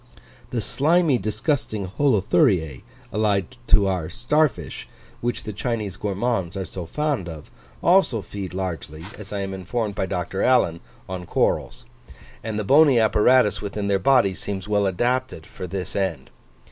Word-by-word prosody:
The 120 -2 -2
slimy 150 - +2
disgusting 110 0 -1
Holuthuriae 100 - +2 0.3
(allied 105 +2 0
to 100 - +5
our 90 -4 -1
star 150 +7 +2
fish), 130 - -9 0.3
which 120 0 -2
the 105 - -5
Chinese 105 -3 -3
gourmands 100 -1 -2
are 95 - -3
so 90 -3 -7
fond 145 - -1
of, 80 -3 -10 0.3
also 170 - +4
feed 95 0 -7
largely, 85 -4 -5
as 105 -2 -10
I 100 -1 -2
am 95 0 -4
informed 100 +3 -3
by 95 - -2
Dr. 95 +1 -3
Allan, 85 -10 +3 0.3
on 90 -2 -6
corals; - - 0 0.6
and 110 -1 -3
the 105 - -1
bony 140 +2 +6
apparatus 110 +1 +4
within 100 0 -3
their 100 -1 +2
bodies 100 -4 +3
seems 100 -1 -4
well 105 -1 +2
adapted 120 -2 -1
for 90 - -8
this 95 +1 -5
end. 95 -5 -2
105 Hz, 150 wpm, -23 LUFS, 95-120 Hz, 0.6 s, bony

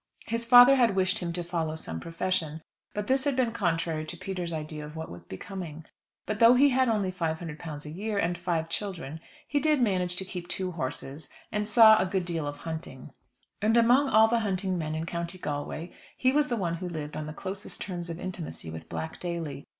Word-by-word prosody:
His 230 +1 -2
father 245 +3 +9
had 235 -6 +4
wished 190 +2 +2
him 175 -2 -2
to 175 0 -3
follow 165 -2 -2
some 80 - -5
profession, 165 - -2 0.3
but 210 0 -2
this 265 +2 +2
had 285 -2 +1
been 250 -3 +2
contrary 165 -6 0
to 175 - -7
Peter's 180 -1 -4
idea 155 -1 -5
of 150 +1 -9
what 160 0 -6
was 90 - -10
becoming. 160 - -7 0.4
But 215 0 -3
though 235 +1 +8
he 280 +3 +6
had 260 -1 +3
only 205 -4 +1
£500 160 -3 -4
a - - -6
year, 205 +5 -3
and 175 -2 +1
five 170 -2 -1
children, 165 -5 -4 0.3
he 290 - +1
did 305 0 +3
manage 185 -6 +1
to 190 - -3
keep 180 -2 -6
two 185 0 -2
horses, 145 -1 -5 0.2
and 210 0 -1
saw 220 0 +8
a 190 - +1
good 185 -1 -1
deal 165 -4 -2
of 145 0 -4
hunting. 160 +1 -7 0.5
And 220 +3 +3
among 250 +4 +5
all 220 -1 +6
the 235 +1 +2
hunting 190 -3 -1
men 155 -2 -2
in 160 +1 -2
County 170 +1 -4
Galway 150 +1 -4 0.2
he 255 - +3
was 295 +2 +3
the 240 - -1
one 170 -4 -1
who 180 +1 -4
lived 150 -3 -5
on 155 - -4
the - - -5
closest 195 +5 -6
terms 175 -3 -4
of 165 0 -5
intimacy 175 - -6
with 80 0 -9
Black 160 0 -5
Daly. 165 -6 -4
175 Hz, 210 wpm, -28 LUFS, 160-215 Hz, 0.5 s, father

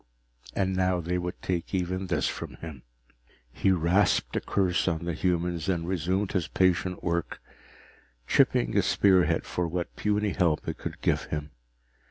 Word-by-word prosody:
And 95 -1 0
now 95 -1 +2
they 90 +2 -1
would 90 0 -4
take 90 +1 -2
even 95 +1 -1
this 90 - +1
from - - -5
him! 80 -6 -9 0.7
He - - +1
rasped 90 +2 +2
a - - +1
curse 95 -3 +1
on 85 -1 -1
the 85 - -1
human 85 0 0
and 85 -3 0
resumed 95 +2 0
his 90 -5 0
patient 90 0 +1
work, 85 -1 -2 0.9
chipping - - +3
a - - +5
spearhead 95 -3 +3
for 90 -1 -2
what 85 +1 -4
puny 105 0 0
help 85 -6 +1
it - - -4
could - - -6
give - - +1
him. 75 -1 -4
90 Hz, 160 wpm, -28 LUFS, 85-95 Hz, 0.9 s, a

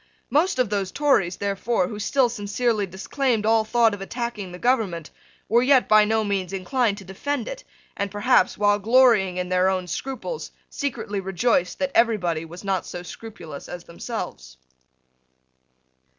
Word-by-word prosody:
Most 350 +6 +2
of 250 -5 +1
those 200 -2 -1
Tories, 265 -12 +2
therefore, 200 0 0
who 210 +1 -6
still 265 +4 +2
sincerely 215 -1 -1
disclaimed 220 +5 -1
all 225 0 +4
thought 225 0 +3
of 205 - -6
attacking 230 -2 -4
the 180 - -8
government, 195 - 0 0.4
were 235 +1 +4
yet 260 0 +4
by 215 0 +6
no 220 +1 +1
means 195 -3 -2
inclined 205 +3 0
to 200 - -9
defend 240 +7 -3
it, - - -6 0.3
and 200 - -2
perhaps, 205 -1 +2
while 205 0 +3
glorying 220 -4 +4
in 180 0 -2
their 185 +1 +3
own 185 -1 -1
scruples, 270 - -5 0.2
secretly 240 -7 -3
rejoiced 190 0 0
that 280 -1 -1
everybody 180 -9 +2
was 175 +4 -11
not 195 -2 0
so 175 - -7
scrupulous 175 -7 -9
as 175 -1 -7
themselves. 115 - -7
205 Hz, 155 wpm, -24 LUFS, 185-240 Hz, 0.4 s, by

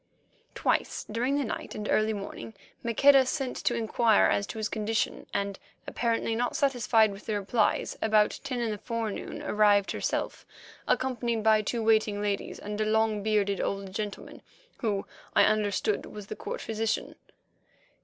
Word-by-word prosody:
Twice - - 0
during 250 +6 0
the 290 - +1
night 230 - -5
and 210 0 -4
early 215 0 +2
morning 205 +1 -6 0.3
Maqueda 270 +4 +6
sent 270 -3 -2
to 240 - 0
inquire 225 -1 +3
as 200 - +1
to - - -7
his 215 -1 -1
condition, 215 +1 -2
and, 200 -1 -2 0.3
apparently 230 -1 -1
not 245 +2 -1
satisfied 240 -6 +3
with 195 +1 -11
the 215 -2 0
replies, 210 +2 0
about 215 -1 +3
ten 260 -3 -3
in 230 -2 0
the 210 - -4
forenoon 225 -2 -4
arrived 205 -2 +3
herself, - - -2 0.4
accompanied 240 -3 0
by 215 -1 +5
two 225 +2 -2
waiting 215 -2 +3
ladies 205 -1 -2
and 210 +1 -5
a - - +2
long 220 -1 +2
bearded 200 -2 +1
old 195 -1 -3
gentleman 205 0 -5 0.4
who, 205 -5 -1 0.3
I 205 - +7
understood, 210 0 +1
was 210 -1 -9
the - - -6
court - - -5
physician. 225 0 -2
215 Hz, 155 wpm, -28 LUFS, 205-230 Hz, 0.4 s, I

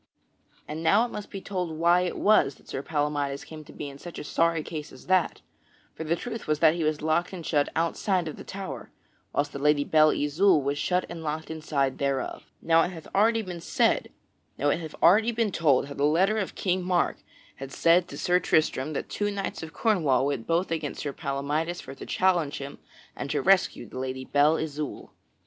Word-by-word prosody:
And 155 +2 -5
now 200 +8 +4
it 245 - -7
must 210 - -7
be 195 - -7
told 180 -5 -4
why 170 +2 +4
it 180 - -2
was 200 -10 +4
that - - -23
Sir 135 - -4
Palamydes 145 -2 -2
came 155 -1 -10
to - - -13
be 145 - -6
in 140 0 -10
such 175 +2 -9
a - - -5
sorry 165 +1 +1
case 150 -2 -6
as 130 - -14
that; 185 -2 +1 0.5
for - - -6
the 160 +2 0
truth 230 +4 -6
was 155 0 +1
that 155 0 +5
he 170 -1 -2
was 155 -1 -1
locked 160 +4 +1
and 170 -4 -7
shut 145 -2 +1
outside 170 +2 0
of 155 - -5
the - - -10
tower, 190 -10 -7 0.4
whilst 145 0 -1
the 140 - -5
Lady 150 0 +3
Belle 155 +1 +5
Isoult 155 +2 +3
was 140 +1 -1
shut 180 +3 +1
and 170 -1 -7
locked 155 +1 -4
inside 145 -4 -1
thereof. 140 -2 -2 0.2
Now 165 0 +5
it 175 - +1
hath 165 -4 -9
already 225 +3 +3
been 180 -3 -7 1.9
told 145 -7 +3
how 140 - -8
the 140 - -2
letter 190 +8 +3
of 195 - -4
King 185 -1 0
Mark 180 -1 +1 0.4
had 135 0 -8
said 170 +4 +3
to - - -9
Sir 180 0 +2
Tristram 155 -3 +1
that - - -3
two 205 0 -2
knights 200 -1 -4
of 160 0 -7
Cornwall 160 - +2
went 140 -5 -2
both 170 +2 +1
against 155 -3 -3
Sir 145 -2 -3
Palamydes 150 +5 -2
for 135 - -9
to 135 - -10
challenge 175 -6 +1
him 140 0 -8 0.4
and 140 - -5
to 145 - 0
rescue 185 -5 +3
the 130 - -8
Lady 130 0 -4
Belle 145 +3 +3
Isoult. 150 -2 -5
160 Hz, 200 wpm, -27 LUFS, 145-180 Hz, 1.9 s, that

